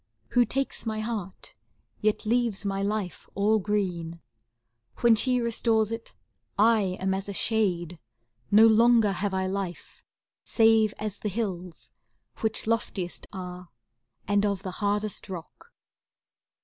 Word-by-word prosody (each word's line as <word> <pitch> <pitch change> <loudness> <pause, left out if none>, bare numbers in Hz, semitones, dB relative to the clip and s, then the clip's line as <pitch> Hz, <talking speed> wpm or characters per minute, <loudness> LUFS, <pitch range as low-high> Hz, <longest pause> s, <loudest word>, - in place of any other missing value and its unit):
Who 245 0 +4
takes 270 +2 -2
my 215 -1 -2
heart, 215 -5 -5 0.5
yet 215 +1 0
leaves 230 -3 +1
my 195 0 -1
life 200 -3 -3
all 210 +2 +3
green. 180 -5 -2 0.8
When 235 -1 +6
she 250 +3 +2
restores 230 -2 +1
it, 230 0 -6 0.4
I 210 -3 +3
am 190 0 0
as 195 +1 -4
a - - -3
shade: 180 -6 +1 0.5
No 215 +2 +7
longer 225 -1 +5
have 195 +1 -2
I 190 0 0
life, 190 -2 -5 0.4
save 225 -2 +3
as 210 -2 -5
the 210 - -2
hills. 185 -5 -5 0.5
Which 220 -1 -1
loftiest 215 -5 -2
are, 180 -2 -8 0.6
and 205 0 +2
of 200 -2 -1
the 185 - -4
hardest 205 0 -1
rock. 185 - -9
205 Hz, 130 wpm, -27 LUFS, 190-225 Hz, 0.8 s, No